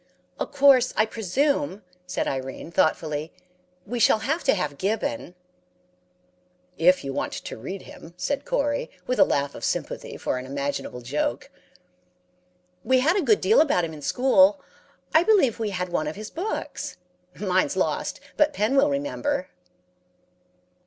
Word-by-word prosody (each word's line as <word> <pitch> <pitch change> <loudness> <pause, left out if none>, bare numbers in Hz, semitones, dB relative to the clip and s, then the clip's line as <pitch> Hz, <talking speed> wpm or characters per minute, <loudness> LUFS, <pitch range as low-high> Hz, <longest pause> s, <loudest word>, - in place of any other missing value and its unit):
"'Of - - -3
course, 275 -3 +5
I 215 - +5
presume,' 230 +2 -1 0.2
said - - -2
Irene, 135 +4 -4
thoughtfully, 155 -1 0 0.5
'we 240 +4 -4
shall 220 - +5
have 305 +10 -2
to 265 - +4
have 150 -7 -3
Gibbon.' 220 +1 -2 1.4
"'If 180 +3 +4
you 135 -1 -4
want - - -2
to - - -6
read 185 - -7
him,' 170 +1 -13
said 285 +7 -2
Corey, 285 0 -1 0.2
with 255 - -1
a - - +9
laugh 140 - 0
of - - -10
sympathy - - -3
for 125 - -2
an 130 - -8
imaginable 140 -2 -4
joke. 125 0 -2 1.3
"'We 260 -1 +3
had 320 +7 +3
a 400 - +2
good 405 +6 +3
deal 450 - +5
about 180 - +2
him 160 - -7
in 150 - -10
school. 280 - +4 0.5
I 320 - +7
believe 355 - +3
we 220 -2 -1
had 180 -2 -3
one 155 -3 -1
of 150 - -4
his 215 +1 -8
books. 360 - -4 0.4
Mine's 185 -2 +1
lost, - - -1 0.2
but 300 0 +3
Pen 220 +2 +1
will 275 +2 +5
remember.' 285 0 -2
220 Hz, 150 wpm, -25 LUFS, -, 1.4 s, a